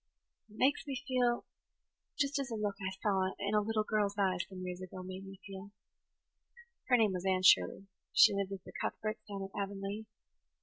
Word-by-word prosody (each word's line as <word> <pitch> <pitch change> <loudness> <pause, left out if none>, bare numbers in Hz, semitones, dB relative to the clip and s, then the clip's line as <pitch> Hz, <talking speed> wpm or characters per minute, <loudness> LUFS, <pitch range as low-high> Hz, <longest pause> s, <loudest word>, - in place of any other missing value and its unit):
It 215 - -15
makes 280 +3 +2
me 270 -3 -2
feel 245 -2 +2 0.7
just 280 0 +1
as 270 -1 -2
a 230 - -3
look 210 -2 -1
I 190 - -1
saw 190 -2 +2
in 200 +1 -2
a 210 - +4
little 215 +1 0
girl's 210 -1 0
eyes 185 -3 +1
some 185 -1 -7
years 180 0 -5
ago 185 0 -7
made 185 +1 -7
me 195 0 -10
feel. 195 0 -8 1.2
Her 250 - +6
name 215 -4 +3
was 180 -1 -3
Anne 185 -1 +2
Shirley 90 - +6
and - - -33 0.2
she - - +7
lived 200 -1 -1
with 195 -2 -6
the - - -12
Cuthberts 215 0 -2
down 200 -1 -4
at 195 - -7
Avonlea. 200 +2 -4
200 Hz, 200 wpm, -34 LUFS, 190-215 Hz, 1.2 s, she